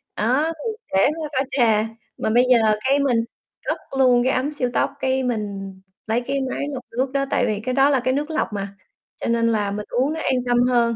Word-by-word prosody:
Đó, 250 +8 +2
thì 445 +8 -3 0.2
để 190 - +5 0.2
pha 305 - -4
pha 270 - +1
trà, 225 -5 +3 0.3
mà - - -1
bây 240 +3 +5
giờ 245 - +8 0.3
cái 280 +1 +4
mình 265 -4 +2 0.5
cất - - 0 0.2
luôn 245 -2 +5
cái 260 - +2
ấm 270 +4 0
siêu 255 -4 -1
tốc, - - +1
cái 265 0 0
mình 200 -5 -3 0.3
lấy 230 +3 +1
cái 275 +3 -2
máy 280 - -3
lọc 255 -2 -5
nước 260 +1 0
đó, 275 0 0
tại 245 - +2
vì 210 -3 -1
cái 255 0 -1
đó 275 +1 +4
là 275 -3 +3
cái 255 +2 0
nước 295 +3 -2
lọc - - 0
mà, 200 -1 -3 0.5
cho - - -2
nên 235 0 +2
là 205 -2 0
mình 210 +1 -4
uống 265 +5 +1
nó 320 - -4
an 260 - +1
tâm 245 0 +3
hơn. 235 -2 +2
250 Hz, 235 wpm, -22 LUFS, 225-270 Hz, 0.5 s, giờ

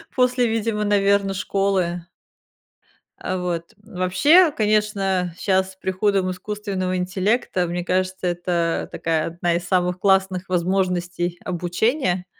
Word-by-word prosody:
после, 250 -1 +2
видимо, 225 -1 -1
наверно, 200 -1 +2
школы. 190 -3 -1 1.1
А, 185 - -3
вот. 175 -2 -3 0.2
Вообще, 220 - +4
конечно, 210 - 0
щас 190 -1 0
с - - -25
приходом 190 0 0
искусственного 185 -1 -3
интеллекта, 185 +1 0
мне 175 +1 -3
кажется, 185 0 -1
это 175 -1 -1
такая 160 -1 -1
одна 170 +1 -1
из 175 +1 -3
самых 180 0 +1
классных 190 -1 +1
возможностей 180 -1 -1
обучения. 180 - -1
185 Hz, 110 wpm, -22 LUFS, 180-200 Hz, 1.1 s, Вообще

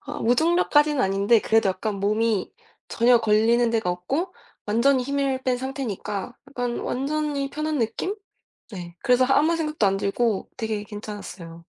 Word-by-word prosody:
아, - - -7
무중력까지는 295 +2 +3
아닌데 200 +1 +3
그래도 220 -2 +2
약간 200 +2 -2
몸이 215 0 0 0.4
전혀 240 +1 +4
걸리는 225 +2 +3
데가 220 -6 0
없고 275 - -3 0.3
완전히 250 +5 +3
힘을 275 -1 -1
뺀 255 -1 +1
상태니까 245 -5 -5
약간 245 -3 -3
완전히 280 +1 -2
편한 305 0 -2
느낌? 230 - -2 0.6
네, 175 -4 -8
그래서 250 +1 +4
아 270 - +4
아무 325 +3 +2
생각도 305 -8 0
안 195 0 +2
들고 200 +1 -1
되게 220 -3 -3
괜찮았어요. 200 -6 -9
235 Hz, 330 characters per minute, -24 LUFS, 210-275 Hz, 0.6 s, 전혀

